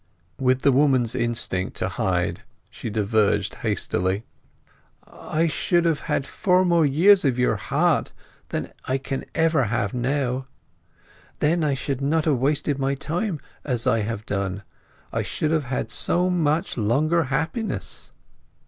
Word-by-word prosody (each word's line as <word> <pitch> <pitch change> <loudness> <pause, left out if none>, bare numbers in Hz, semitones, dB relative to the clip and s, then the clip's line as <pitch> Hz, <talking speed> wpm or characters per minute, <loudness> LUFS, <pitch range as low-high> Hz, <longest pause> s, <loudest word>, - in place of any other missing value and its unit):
With 130 0 +2
the 140 - +5
woman's 130 -4 +3
instinct 120 -6 -1
to - - 0
hide 90 -1 -1 0.3
she - - -6
diverged 105 0 +1
hastily— 95 +4 -1 0.8
"I 160 +2 -2
should 170 +2 +1
have 165 -3 +2
had 135 - +1
four 180 -1 +2
years 185 +8 +5
more 140 - +4
of 125 - -2
your 125 - +2
heart - - +1 0.4
than - - -4
I 130 - 0
can 135 0 -4
ever 160 -5 +3
have 100 -2 -1
now. 130 +1 -1 0.9
Then 165 +2 +1
I 145 -2 +1
should 135 0 -3
not 155 +3 +1
have 150 -5 +2
wasted 145 +1 0
my 135 +1 0
time 165 +4 -2 0.2
as 125 -4 -1
I 115 - +3
have 110 0 -3
done—I 100 0 -5
should 155 - -2
have 155 -3 +1
had 125 -3 -3
so 180 +8 +1
much 160 -4 0
longer 155 +10 +2
happiness!" 160 - -3
135 Hz, 140 wpm, -24 LUFS, 115-160 Hz, 0.9 s, the